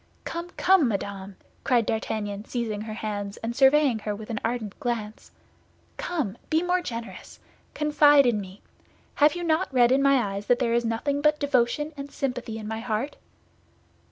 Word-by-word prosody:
Come, 340 +1 -5
come, 370 -6 +4
madame!" 200 -2 -4 0.3
cried 240 -4 +2
D'Artagnan, 210 -2 -3
seizing 225 -4 -3
her 215 0 -6
hands, 205 -2 -4
and 230 +1 -4
surveying 270 -3 +4
her 210 0 -3
with 215 +2 -8
an 215 - -2
ardent 225 -3 -3
glance, 230 -5 -4 0.7
"come, 300 - -3
be 320 +1 +2
more 360 0 +1
generous. 230 -8 -7 0.4
Confide 295 -1 +5
in 225 -4 +2
me. 190 +1 -11 0.5
Have 295 +1 +4
you 350 - -4
not 330 +2 +1
read 245 -2 +4
in 270 +1 +4
my 275 0 +5
eyes 200 -3 -2
that 245 - +4
there 235 -2 0
is 235 0 +1
nothing 280 +6 -1
but 300 0 +3
devotion 285 +2 +1
and 280 0 -7
sympathy 250 -5 -4
in 215 -1 -7
my 220 0 -3
heart?" 230 +5 -3
240 Hz, 170 wpm, -26 LUFS, 215-290 Hz, 0.7 s, Confide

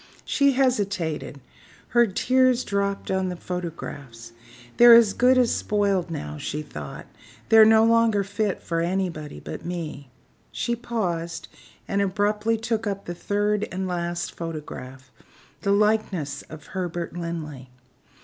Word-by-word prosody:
She 280 -1 +3
hesitated; 195 - -1 0.5
her 240 -1 +4
tears 255 +5 +2
dropped 200 -1 -2
on 190 -1 0
the 180 - -4
photographs. 145 -10 -7 0.5
"They're 240 -1 +10
as 225 -4 +6
good 255 +1 +4
as 250 -2 +3
spoiled 200 -4 0
now," 75 - -5
she 150 +1 -4
thought; 75 - -8 0.4
"they're 220 -1 +8
no 220 0 +6
longer 230 -3 +3
fit 205 0 -2
for 165 -1 -1
anybody 170 -4 -2
but - - -8
me." 160 -6 -6 0.4
She 235 0 -1
paused, 175 -9 -3 0.4
and 200 0 0
abruptly 210 +3 +1
took 225 -1 -2
up 200 -1 -3
the 175 - -4
third 205 +3 0
and 185 +1 -3
last 175 -1 -3
photograph 135 -5 -8 0.5
the 200 - 0
likeness 200 -9 +1
of 155 -1 -10
Herbert 175 -2 -4
Linley. 155 -6 -6
190 Hz, 130 wpm, -24 LUFS, 165-220 Hz, 0.5 s, They're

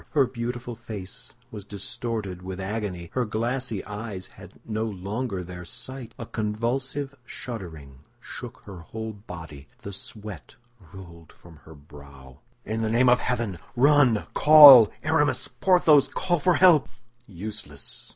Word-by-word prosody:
Her 140 -3 +4
beautiful 120 0 -5
face 110 -5 -10 0.2
was 105 -2 -8
distorted 100 -1 -5
with 95 0 -7
agony; 95 -4 -4
her 125 - 0
glassy 115 0 -2
eyes 105 -2 -6
had - - -14
no 110 0 -2
longer 100 0 -4
their 90 0 -9
sight; 130 +7 -7
a 115 - -6
convulsive 125 +7 -3
shuddering 80 - -8 0.2
shook - - -9
her 95 -3 -10
whole 110 +6 -7
body; 85 -8 -11 0.2
the 100 - -7
sweat 105 +1 -8 0.4
rolled 85 -4 -13
from 85 -2 -17
her 80 - -13
brow. 70 -3 -15 0.3
"In 110 +2 -3
the 110 - -1
name 120 +3 +3
of 125 - +5
heaven, 115 -8 -2 0.2
run, 135 -4 +4
call! 145 -7 +10
Aramis! 155 -2 +1
Porthos! 160 -7 +4
Call 175 +4 -1
for 175 +4 +2
help!" 175 -6 +5 0.4
"Useless!" 95 -7 -8
110 Hz, 135 wpm, -25 LUFS, 90-125 Hz, 0.4 s, call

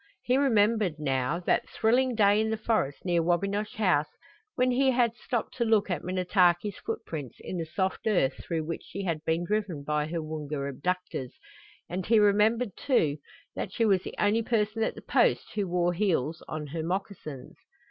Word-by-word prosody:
He 250 - +2
remembered, 220 - +3
now, 135 +2 0
that - - +1
thrilling 245 +3 +2
day 205 -1 +4
in 220 - 0
the 220 - -1
forest 215 -11 -1
near 175 -2 +2
Wabinosh 200 +5 0
House 175 -8 +2 0.5
when 255 0 +2
he 265 +2 +3
had 240 -3 +2
stopped 240 -1 -3
to 240 - +2
look 215 -3 +2
at 170 - -2
Minnetaki's 185 +1 +2
footprints 145 -6 -5
in 185 - -5
the 165 - -3
soft 190 +6 -2
earth 175 -11 +1
through 165 -2 -2
which 165 +1 -4
she 200 +3 -6
had 165 -4 -2
been 165 +2 +1
driven 200 -7 -2
by 150 +1 0
her 165 +1 -3
Woonga 150 -2 -4
abductors, 160 -2 -3 0.5
and 180 +1 -4
he 225 +1 +5
remembered, 210 +3 +3
too, 155 - +1 0.4
that - - -4
she 230 - +1
was 195 -4 +3
the - - -8
only 210 +2 +2
person 220 -1 0
at 220 - 0
the - - -11
Post - - +2
who 205 -2 -1
wore 175 0 +1
heels 170 -5 0
on 155 -1 -4
her 160 +3 -4
moccasins. 165 -6 -5
185 Hz, 180 wpm, -28 LUFS, 160-215 Hz, 0.5 s, he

